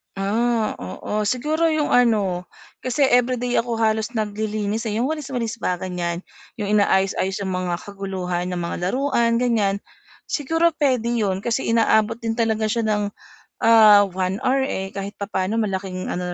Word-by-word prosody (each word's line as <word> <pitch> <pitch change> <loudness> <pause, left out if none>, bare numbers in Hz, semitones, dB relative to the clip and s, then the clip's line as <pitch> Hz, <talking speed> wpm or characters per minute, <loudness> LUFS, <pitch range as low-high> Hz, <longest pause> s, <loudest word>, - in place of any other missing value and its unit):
Ah, 220 +3 0
oo, 205 - -3
siguro 305 +8 +1
'yong 310 -2 0
ano 205 -7 +2 0.3
kasi 255 +3 0
everyday 245 0 +2
ako 235 -1 -2
halos 220 +1 0
naglilinis, 215 +1 -2
eh, 210 - -2
yung 260 - 0
walis-walis 255 -7 -4
ba 180 -3 0
ganyan, 175 -1 -4 0.3
yung 210 -3 -3
inaayos-aayos 195 -1 +2
ng 190 - -3
mga 180 -1 -2
kaguluhan 190 -3 -4
ng 180 -1 -3
mga 170 - -3
laruan 235 0 +1
ganyan, 205 -5 +1 0.5
siguro, 325 +4 +1
puwede 260 -7 +1
yun, 200 -5 0
kasi 235 +2 -1
inaabot 225 -1 +3
din 225 -1 -1
talaga 220 -2 +1
siya 230 0 0
ng 210 -1 +1 0.6
ah, 215 -2 +8
1 185 +2 -2
hour, 265 +1 +2
eh, 195 -7 -3
kahit 200 +1 -6
papaano 200 0 -2
malaking 190 -3 -3
ano 180 0 -3
215 Hz, 150 wpm, -22 LUFS, 195-240 Hz, 0.6 s, ah